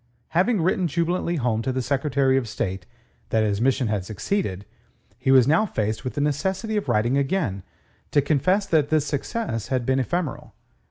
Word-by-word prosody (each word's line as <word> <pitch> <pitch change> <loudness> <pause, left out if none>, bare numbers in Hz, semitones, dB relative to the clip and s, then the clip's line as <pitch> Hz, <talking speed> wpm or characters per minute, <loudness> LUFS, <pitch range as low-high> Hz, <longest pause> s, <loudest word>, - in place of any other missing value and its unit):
Having 185 +5 +2
written 185 0 +1
jubilantly 170 +2 -1
home 120 -6 0
to 130 - -1
the 130 0 -2
Secretary 135 0 +1
of 130 -3 0
State 95 -2 -4 0.4
that 110 -1 +2
his 105 0 0
mission 130 0 +2
had 105 -3 -1
succeeded, 100 - -3 0.5
he 130 - -1
was 130 -2 +6
now 165 +9 +3
faced 110 - -2
with 130 - -4
the 145 - -1
necessity 190 +9 -1
of 210 - -2
writing 120 +6 +2
again 135 - -1 0.5
to 145 - +3
confess 155 +8 +2
that 155 -5 +2
this 155 -2 +2
success 145 - -3
had 130 -2 -1
been 130 +1 +2
ephemeral. 170 +3 -3
135 Hz, 175 wpm, -24 LUFS, 120-170 Hz, 0.5 s, was